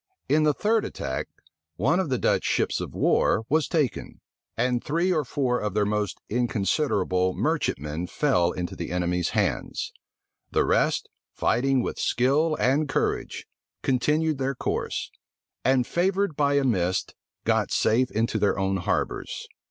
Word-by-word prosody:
In 150 +2 +3
the 150 -1 +3
third 220 +1 +2
attack, 65 -1 -4 0.5
one 135 - +2
of 185 -5 -1
the 130 - +1
Dutch - - +1
ships - - 0
of - - -6
war 110 - +2
was 155 +1 +2
taken; 150 -7 -1 0.4
and 120 +1 +1
three 170 +5 +1
or 155 -3 +1
four 125 -1 0
of 105 -2 -3
their 105 -1 +2
most 105 -2 -1
inconsiderable 100 - 0
merchantmen 75 +5 -1
fell 90 - +2
into 90 -1 -4
the - - -5
enemies' 90 0 0
hands. 90 - -1 0.6
The - - +2
rest, - - +1 0.3
fighting 130 0 +2
with - - -4
skill 145 +6 +2
and 140 +4 +2
courage, - - -1 0.4
continued 150 +3 +1
their 135 +1 -1
course; - - -3 0.5
and, 130 -1 +3
favored 190 +1 0
by 145 -1 +2
a 140 - +3
mist, 95 -7 0 0.3
got - - +2
safe 125 +3 +2
into 115 +2 0
their 100 - +2
own 95 0 0
harbors. 90 - -2
125 Hz, 145 wpm, -26 LUFS, 95-150 Hz, 0.6 s, In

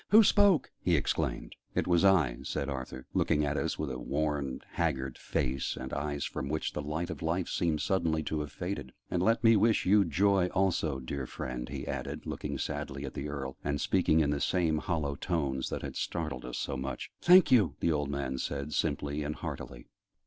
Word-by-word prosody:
"Who 220 +2 +8
spoke?" 200 -7 +4
he - - +2
exclaimed. - - -1 0.2
"It - - +1
was 85 -1 +3
I," 80 -11 +4
said 70 - -3
Arthur, 65 -1 -5
looking 75 0 +2
at 70 - -1
us - - -1
with - - -2
a 65 - -4
worn, 75 -4 -1
haggard 70 -6 -1
face, 65 0 -2
and 65 0 -6
eyes 70 0 -2
from 70 - -4
which 80 +1 -2
the - - -3
light 80 +4 -3
of 80 - -7
life 85 +2 0
seemed 80 -4 0
suddenly 80 -3 +1
to 80 0 -2
have 75 -1 -4
faded. 90 -8 -5 0.2
"And 90 - +1
let 115 +4 +2
me 115 0 +7
wish 110 +2 +3
you 100 +2 +6
joy 95 +3 +3
also, 85 -7 +1
dear 65 0 -4
friend," 65 -1 -5
he - - -5
added, - - -4
looking - - -4
sadly - - -4
at - - -6
the 75 - -4
Earl, 65 -2 -5
and 70 0 -1
speaking 80 -2 +3
in 75 -2 +2
the 70 - -1
same 80 -4 +2
hollow 75 -5 -1
tones 70 -4 -1
that - - -4
had - - -5
startled 80 -7 -3
us 60 - -5
so - - -2
much. 65 0 -5
"Thank 180 0 +7
you," 100 - +5
the 85 - +2
old 75 -2 0
man 70 -2 -2
said, 70 +3 -3
simply 70 +1 -1
and 75 +1 -3
heartily. - - -6
75 Hz, 200 wpm, -31 LUFS, 70-90 Hz, 0.2 s, Who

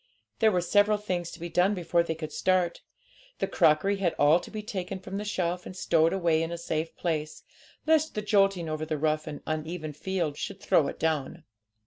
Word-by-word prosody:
There 220 - +5
were 180 -2 +1
several 205 +3 +3
things 180 -5 -3
to - - -11
be 170 - -4
done 180 +4 +2
before 170 -1 +1
they 165 -1 -2
could 155 -1 -6
start; 185 -2 +1 0.6
the - - 0
crockery 195 +7 +3
had 185 -4 0
all 150 +4 +5
to - - -11
be 215 -1 -6
taken 190 -2 -4
from 190 +1 -6
the 205 - -3
shelf 180 -4 -2
and 185 - -9
stowed 165 -2 +3
away 170 -4 +2
in 165 +1 -2
a 170 - -3
safe 165 -1 -3
place, 155 -3 -3 0.4
lest 315 0 +2
the 210 - -2
jolting 195 -5 +2
over 155 0 -3
the 155 -1 -2
rough 155 +1 0
and 150 -2 -7
uneven 155 0 -4
field 165 -2 -2
should - - -5
throw 145 - +3
it - - -6
down. 160 +1 -1
170 Hz, 205 wpm, -28 LUFS, 155-190 Hz, 0.6 s, There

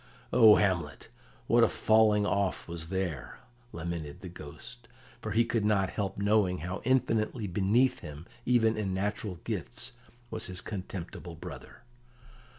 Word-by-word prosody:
"O 110 -3 +9
Hamlet, 95 -4 0 0.4
what 120 0 +5
a - - +7
falling 110 -2 +4
off 95 -13 0
was 85 -1 -6
there!" 90 -8 -3 0.3
lamented 85 -3 -5
the 90 - -7
Ghost, 75 -7 -11 0.3
for - - -4
he 115 +2 +3
could 115 -2 0
not 100 -3 +2
help 100 -3 -3
knowing 100 -2 +2
how 90 +2 -4
infinitely 115 -3 +1
beneath 105 +7 +2
him, 75 0 -9 0.2
even 115 -3 +3
in 95 -3 -1
natural 105 0 -2
gifts, - - -5 0.4
was 110 -1 -3
his 90 -1 -2
contemptible 95 -2 -6
brother. - - -10
100 Hz, 140 wpm, -30 LUFS, 85-110 Hz, 0.4 s, O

